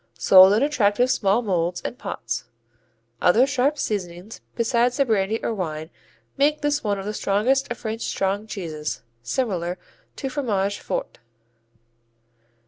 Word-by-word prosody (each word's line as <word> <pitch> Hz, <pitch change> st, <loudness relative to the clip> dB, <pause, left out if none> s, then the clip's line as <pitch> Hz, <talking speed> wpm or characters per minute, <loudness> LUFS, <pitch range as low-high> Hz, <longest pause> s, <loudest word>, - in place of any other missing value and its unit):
Sold 190 Hz, +5 st, +8 dB
in 220 Hz, +6 st, +3 dB
attractive 250 Hz, -4 st, +2 dB
small 210 Hz, 0 st, +2 dB
molds 175 Hz, -4 st, 0 dB
and -, -, -4 dB
pots. -, -, -5 dB, 0.8 s
Other 220 Hz, +8 st, +5 dB
sharp 275 Hz, +2 st, +1 dB
seasonings 190 Hz, -3 st, -4 dB
besides 240 Hz, +1 st, +1 dB
the 275 Hz, -, +3 dB
brandy 220 Hz, -1 st, +1 dB
or -, -, -1 dB
wine 160 Hz, -5 st, -4 dB, 0.5 s
make 295 Hz, +2 st, +2 dB
this 290 Hz, 0 st, 0 dB
one 205 Hz, -2 st, 0 dB
of 195 Hz, -, -6 dB
the 210 Hz, -, -3 dB
strongest 245 Hz, +8 st, +1 dB
of 240 Hz, -, -4 dB
French 220 Hz, +1 st, -5 dB
strong 195 Hz, +2 st, -1 dB
cheeses, 155 Hz, -, -5 dB, 0.2 s
similar 180 Hz, -, -2 dB, 0.4 s
to 270 Hz, -, -4 dB
Fromage 205 Hz, -8 st, -1 dB
Fort. -, -, -4 dB
210 Hz, 135 wpm, -23 LUFS, 190-250 Hz, 0.8 s, Sold